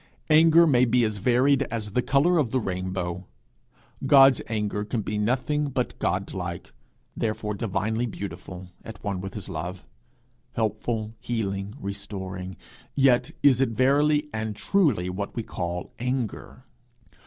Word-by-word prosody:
Anger 165 +2 +7
may 130 -5 +4
be 125 0 +3
as 110 -2 0
varied 125 +6 +3
as 110 -2 -4
the 125 - +1
colour 150 +7 +3
of 135 -6 +1
the 130 - +1
rainbow. 95 -3 -3 0.8
God's 135 -2 +7
anger 105 -2 -2
can 110 +1 -3
be 105 +1 -2
nothing 130 +7 0
but 125 -2 -3
Godlike, 90 -1 -3 0.4
therefore 105 -1 -2
divinely 110 +3 -1
beautiful, 90 -3 -7
at 110 -3 -10
one 100 -3 -2
with 95 +1 -7
his 105 -2 -6
love, 90 +4 -5 0.7
helpful, 110 0 -2
healing, 100 -3 -3
restoring; 95 -2 -6 0.4
yet 135 -3 +4
is 135 -2 +5
it 135 - +3
verily 145 +5 +3
and 110 -1 -3
truly 140 - +2
what 95 +2 -4
we 115 - -2
call 90 -3 -5
anger. 125 0 -3
110 Hz, 135 wpm, -26 LUFS, 95-130 Hz, 0.8 s, Anger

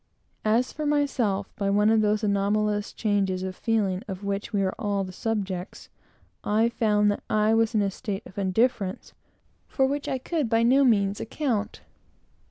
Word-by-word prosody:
As 230 +4 +1
for 305 0 -3
myself, 250 -9 0
by 200 -1 0
one 210 +2 +3
of 225 -1 +4
those 210 +1 +1
anomalous 205 +1 0
changes 195 -4 0
of 190 0 -4
feeling 200 -5 0
of 190 -1 -6
which 200 +2 -3
we 200 -3 +1
are 190 - 0
all 200 -1 -1
the 185 - -7
subjects, 195 -3 -4 0.5
I 220 +3 +2
found 210 -3 +2
that 205 - -4
I 215 +1 +3
was 225 0 +2
in 210 - +3
a 200 - 0
state 205 +1 -5
of 200 - -9
indifference, 195 0 0 0.5
for 265 - +1
which 285 +2 -2
I 265 - 0
could 290 -1 -2
by 225 +1 +3
no 265 +4 +5
means 200 -5 +2
account. 225 -4 -2
210 Hz, 175 wpm, -26 LUFS, 200-230 Hz, 0.5 s, no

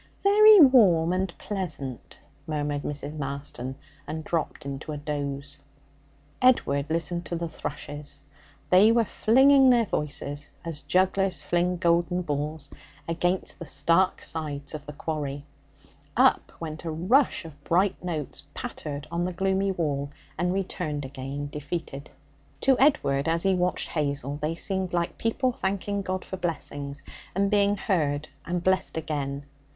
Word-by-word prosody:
'Very 420 +1 +8
warm 195 - +6
and 185 0 0
pleasant,' 155 - -5 0.3
murmured 145 -2 -1
Mrs. 145 +1 -5
Marston, 140 -2 -5 0.3
and 160 0 -4
dropped 155 -2 -2
into 140 +2 -5
a - - -4
doze. 140 -1 -4 0.8
Edward 150 - +3
listened 170 +2 -1
to 175 - -2
the 170 0 -2
thrushes; 145 -2 -7 0.5
they 195 +5 +7
were 230 0 +3
flinging 265 +6 +5
their 240 -2 +5
voices 145 -3 -3
as 160 -3 -5
jugglers 190 0 +1
fling 175 +1 0
golden 175 +1 +2
balls 150 -1 -3 0.4
against 175 +3 -1
the 170 - -6
stark 170 +4 +2
sides 145 -3 -4
of 150 -1 -7
the 150 - -6
quarry. 145 -2 -4 0.7
Up - - +4
went 160 -1 -6
a 165 - -3
rush 195 - +2
of 145 -3 -12
bright 185 +5 +1
notes, 160 -5 -4
pattered 145 -1 -5
on 170 +1 0
the 180 - -1
gloomy 190 +1 +1
wall, 145 -6 -1 0.3
and 180 0 0
returned 180 -6 -2
again 135 +2 -5
defeated. 150 -1 -5 0.5
To 270 - +5
Edward, 140 - +3
as 165 +1 +1
he 195 -1 +3
watched 180 0 0
Hazel, 145 -2 -2
they 155 +2 -1
seemed 190 0 -1
like 170 -1 -1
people 250 +3 +1
thanking 200 -2 -2
God 185 -1 -3
for 190 - -5
blessings, 145 -5 -4 0.3
and 200 +1 +2
being 205 0 +3
heard 155 -6 0 0.2
and 175 0 -2
blessed 185 -3 +1
again. 145 -3 -3
165 Hz, 140 wpm, -27 LUFS, 145-190 Hz, 0.8 s, Very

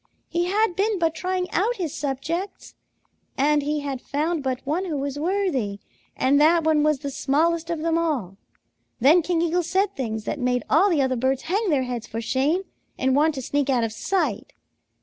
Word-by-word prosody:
He 345 0 0
had 400 0 +1
been 410 +2 +1
but 330 -2 +1
trying 365 +1 -2
out 440 +7 +1
his 340 - -3
subjects, 310 +8 -4 0.6
and 295 +2 +3
he 295 +1 -1
had 275 -3 -4
found 310 +3 -1
but 260 -1 -3
one 325 +7 -1
who 320 -5 -3
was 280 +1 -3
worthy, 320 - -1 0.4
and 280 +2 +3
that 330 +2 +5
one 310 -1 +3
was 305 -1 +2
the 280 +1 -5
smallest 325 +5 0
of 330 -2 -2
them 330 0 +1
all. 255 - -2 0.6
Then 300 +9 +6
King 335 0 0
Eagle 345 +1 +1
said 385 +4 0
things 220 -4 -3
that 290 - -3
made 250 -2 0
all 360 +8 +5
the 310 -7 +2
other 260 -1 0
birds 260 +2 0
hang 405 +4 0
their 280 -5 +2
heads 245 -3 -4
for 225 - -5
shame 275 - 0 0.3
and 260 0 +1
want 305 +2 +3
to 265 - -5
sneak 285 +2 -1
out 250 -3 +2
of 225 -1 -2
sight. 380 - -2
300 Hz, 195 wpm, -24 LUFS, 265-345 Hz, 0.6 s, Then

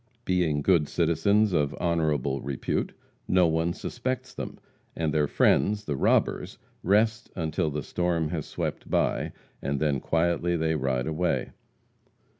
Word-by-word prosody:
Being 85 -6 +1
good 85 -5 +3
citizens 100 +5 +2
of 75 -3 +1
honorable 75 -6 0
repute, 70 -1 -2 0.3
no 90 -1 +4
one 80 +1 +1
suspects 125 +7 -4
them, - - -6 0.4
and 80 -2 -1
their 75 -2 +2
friends, 105 +7 +2
the 75 - -2
robbers, - - +1 0.2
rest 110 +3 +2
until 80 -1 -1
the 75 -1 -3
storm 85 -2 0
has 80 -3 -3
swept - - -4
by, - - +1 0.3
and 70 0 -1
then 75 -3 +1
quietly 85 +3 +1
they 80 0 +1
ride 65 -4 0
away. 80 +4 -1
80 Hz, 135 wpm, -27 LUFS, 75-90 Hz, 0.4 s, no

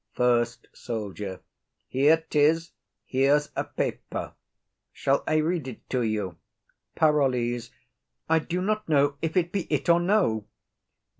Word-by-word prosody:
FIRST 120 -1 +1
SOLDIER. 105 -4 -5 0.5
Here 150 +5 +3
'tis; 160 +3 +2 0.3
here's 140 +3 +2
a - - 0
paper; - - -4 0.6
shall 135 +1 0
I 155 - +2
read 155 -1 0
it 125 - -9
to 130 - +1
you? 105 -6 -2 0.6
PAROLLES. 125 -6 +2 0.6
I 160 0 +4
do 175 +3 -3
not 215 -1 -1
know 145 -1 +3
if 160 +2 -1
it 175 -1 +2
be 195 -4 -2
it - - 0
or 170 0 +6
no. 175 - +1
145 Hz, 130 wpm, -26 LUFS, 120-165 Hz, 0.6 s, or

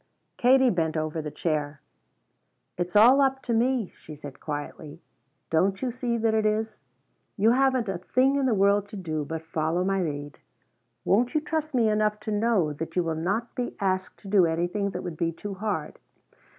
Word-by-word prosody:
Katie 260 0 +4
bent 165 -3 0
over 155 +1 -2
the 150 - -5
chair. 150 -2 -2 1.0
"It's 175 +1 -4
all 245 +7 +7
'up 270 -1 +1
to 235 - -1
me,'" 240 -2 +1
she 155 - -11
said 145 -2 -10
quietly. 150 +1 -6 0.5
"Don't 190 +4 +2
you 255 - 0
see 240 -1 -2
that 225 -1 +1
it 220 0 +2
is? 215 -1 -1 0.6
You 220 +3 +4
haven't 260 -2 +2
a 190 -3 -3
thing 260 +8 +2
in 275 -2 +1
the 235 - +2
world 200 +1 +3
to 210 - -10
do 160 -6 -3
but 160 +2 -5
follow 160 +2 -1
my 195 0 0
lead. 145 -3 -4 0.7
Won't 240 +9 +2
you 305 - +3
trust 310 -2 -3
me 235 -3 +3
enough 210 0 +1
to 215 - -4
know 205 -7 +1
that 165 +2 -6
you 180 - +2
will 165 -1 -1
not 200 +9 -2
be 245 -1 -4
asked 185 -1 -1
to - - -10
do 195 -3 +4
anything 175 +5 -1
that 180 -1 -5
would 175 -3 -6
be 165 0 0
too 200 +5 -7
hard? 190 -6 -4
195 Hz, 190 wpm, -26 LUFS, 165-230 Hz, 1.0 s, all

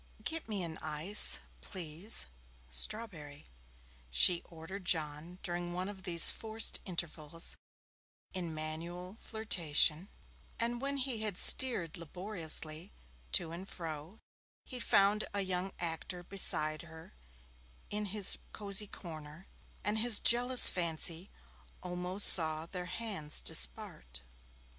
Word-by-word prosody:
'Get 320 -2 -3
me 200 -4 -2
an 160 -2 -5
ice, 155 +7 +4 0.2
please 175 - -3 0.5
strawberry,' 150 - -2 0.6
she 170 - +4
ordered 170 +4 -10
John 160 0 -2
during 175 0 -4
one 180 +1 -4
of 200 -2 -8
these 175 -3 +4
forced 220 0 -1
intervals 165 -3 -2 0.8
in 180 -3 -4
manual 170 +5 -5
flirtation; 180 -5 0 0.5
and 235 +1 -2
when 280 +1 -2
he 255 -4 -2
had 210 -4 -3
steered 195 -12 +2
laboriously 170 -1 -2 0.4
to 165 -2 +3
and 180 +3 -8
fro, 165 +2 -8 0.5
he 255 - -5
found 205 -1 +2
a 200 - 0
young 185 0 -2
actor 175 +1 -5
beside 155 -5 +1
her 160 - -14 0.8
in 210 0 -2
his 200 0 +1
cosy 205 0 0
corner, 155 -1 -11 0.4
and 210 +1 0
his 230 -2 +3
jealous 245 +1 +7
fancy 170 +1 -2 0.5
almost 180 +2 +2
saw 160 -2 +9
their 180 +1 -7
hands 185 -6 0
dispart. 60 -1 -2
180 Hz, 115 wpm, -32 LUFS, 160-205 Hz, 0.8 s, saw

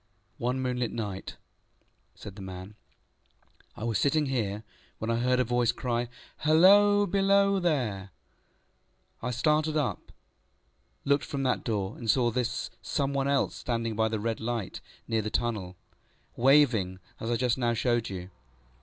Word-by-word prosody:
ŌĆØ - - -4
ŌĆ£One 125 +1 +1
moonlight 125 -2 -1
night, 105 -4 -4 0.9
ŌĆØ - - -24
said 100 - -9
the 100 - -9
man, 95 +1 -8 1.0
ŌĆ£I 110 - -4
was 115 -3 0
sitting 150 +2 +2
here, 110 -6 -2 0.3
when 110 +1 -2
I 115 - +1
heard 125 +1 +2
a - - +4
voice 120 0 +1
cry, 120 -1 -2 0.3
ŌĆśHalloa! 200 +5 +6
Below 200 0 +3
there! 120 - -1 1.1
ŌĆÖ 115 - -3
I - - 0
started 150 +5 +1
up, 145 - -2 0.9
looked 140 0 +2
from 140 -1 -3
that 130 -1 0
door, 105 -3 -2
and 115 -3 -5
saw 120 -1 +3
this 125 0 -2
Some 140 0 -1
one 135 0 0
else 140 -1 +1
standing 115 -2 -2
by 110 +1 +2
the 110 -1 -2
red 115 +1 -2
light 115 -3 -3 0.3
near 115 -1 +1
the 110 - -3
tunnel, 105 -6 -2 0.6
waving 120 -8 +4 0.2
as 115 - -4
I 120 - +2
just 125 +1 0
now 120 -1 +1
showed 120 0 0
you. 95 -1 -7
120 Hz, 160 wpm, -28 LUFS, 110-140 Hz, 1.1 s, ŌĆśHalloa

